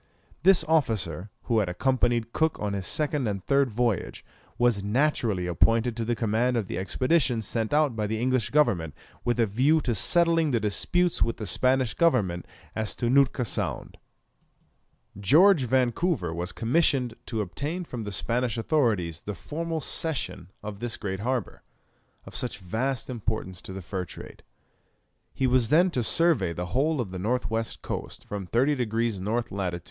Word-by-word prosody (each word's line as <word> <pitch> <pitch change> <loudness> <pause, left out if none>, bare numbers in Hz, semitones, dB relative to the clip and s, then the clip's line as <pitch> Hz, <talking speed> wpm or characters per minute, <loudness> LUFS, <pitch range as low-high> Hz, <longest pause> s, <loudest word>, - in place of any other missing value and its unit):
This 185 -1 +6
officer, 110 - 0
who 115 -2 +1
had 100 -4 0
accompanied 120 +3 0
Cook 160 -1 +1
on 105 -1 -2
his 95 -2 -3
second 150 -4 0
and 100 -3 -3
third 140 -1 +3
voyage, 115 -3 -1 0.3
was 120 -5 +2
naturally 110 -4 +1
appointed 115 +7 +2
to 115 - -2
the 120 +1 -1
command 115 +3 +1
of 110 - -1
the 90 - -4
expedition 130 - +1
sent 110 +1 -2
out 150 -4 +2
by 105 -1 -1
the 110 +1 -2
English 130 -1 +1
government 85 - +1 0.3
with 120 0 0
a 115 - +5
view 130 +10 +3
to 125 -3 -1
settling 165 - +4
the 120 -4 +1
disputes 170 - 0
with 115 - +1
the 110 - -5
Spanish 130 +1 +1
government 105 - +1 0.3
as 110 -4 -2
to 120 0 -1
Nootka 135 -2 +3
Sound. - - -3 1.2
George 155 - +5
Vancouver 125 - +1
was 90 +2 -3
commissioned 125 - +1
to 115 - -3
obtain 145 - -4
from 120 -7 -6
the 105 - -5
Spanish 120 +5 -1
authorities 110 - 0
the 105 - -5
formal 165 - -4
cession 140 - -2
of 105 -1 -6
this 120 0 -4
great 95 -2 -4
harbour, 125 +2 -3 0.6
of - - -11
such 125 - -2
vast 115 +7 -2
importance 110 -6 -4
to - - -9
the 95 0 -7
fur 90 +1 -4
trade. - - -11 0.9
He 135 - -1
was 125 -3 +2
then 175 +4 +4
to 125 - 0
survey 120 - +2
the 90 +1 -5
whole 150 +4 +1
of 110 -7 -3
the 95 - -5
north 110 +3 -1
west 115 0 -3
coast, - - -6
from 100 -3 -6
30 130 +9 +2
degrees 115 -5 -1
N. 115 +5 0
lat. 90 -3 -2
115 Hz, 170 wpm, -26 LUFS, 100-135 Hz, 1.2 s, This